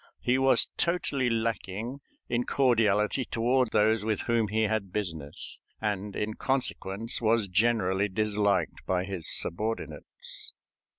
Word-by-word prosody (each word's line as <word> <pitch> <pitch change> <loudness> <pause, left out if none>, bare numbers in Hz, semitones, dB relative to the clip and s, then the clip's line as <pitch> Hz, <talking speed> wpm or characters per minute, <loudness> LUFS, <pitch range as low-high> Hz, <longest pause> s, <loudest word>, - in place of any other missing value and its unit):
He 125 +1 +1
was 135 0 +5
totally 145 -7 +1
lacking 115 +2 -2 0.3
in 120 0 0
cordiality 115 -2 +2
toward 125 +1 +1
those 110 0 +3
with 110 -1 0
whom 115 -2 +1
he 110 +2 +1
had 105 -3 -1
business, 80 -8 -4 0.2
and 105 -2 -2
in 105 +1 -2
consequence 115 -4 -1
was 110 -2 +2
generally 100 -1 +2
disliked 100 -4 0
by 90 -1 +1
his 95 -5 -2
subordinates. 85 -6 -3
110 Hz, 120 wpm, -28 LUFS, 100-120 Hz, 0.3 s, was